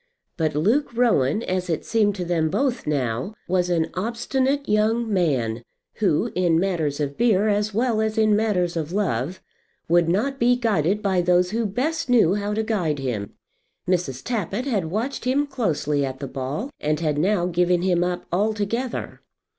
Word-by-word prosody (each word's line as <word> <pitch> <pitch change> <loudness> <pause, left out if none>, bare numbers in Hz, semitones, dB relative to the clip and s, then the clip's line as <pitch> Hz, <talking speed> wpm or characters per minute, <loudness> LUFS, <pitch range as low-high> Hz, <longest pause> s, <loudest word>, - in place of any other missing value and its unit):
But 155 -3 -1
Luke 220 - +2
Rowan, 220 - +2
as 185 -1 -2
it 165 - -2
seemed 210 -3 +2
to 180 -3 -4
them 165 -2 +1
both 260 - -1
now, 130 - -1
was 180 0 +1
an 165 -2 0
obstinate 260 +7 -1
young 220 +3 +2
man, 130 - 0 0.4
who, 205 +2 +1
in 175 -3 +2
matters 165 -6 -1
of 140 -1 -3
beer 220 -3 +3
as 210 0 +1
well 225 +1 +1
as 220 0 -1
in 215 -1 +4
matters 190 -6 0
of 160 -1 -3
love, 180 - -2 0.4
would 170 0 +3
not 270 +10 0
be 245 +1 +4
guided 210 -4 0
by 190 -3 +2
those 180 +1 +2
who 225 0 0
best 295 +9 -2
knew 220 -8 +5
how 205 0 -2
to 220 - 0
guide 185 -9 -1
him. 120 -7 -4 0.5
Mrs. 170 -8 -1
Tappitt 225 0 -2
had 215 -11 0
watched 225 +13 -3
him 275 +3 +2
closely 160 - -1
at 130 -1 -3
the 140 - -4
ball, 140 - -4
and 150 0 0
had 150 -3 0
now 185 +1 +2
given 180 0 +1
him 175 -2 +2
up 180 0 -2
altogether. 215 +6 -2
185 Hz, 170 wpm, -23 LUFS, 160-225 Hz, 0.5 s, knew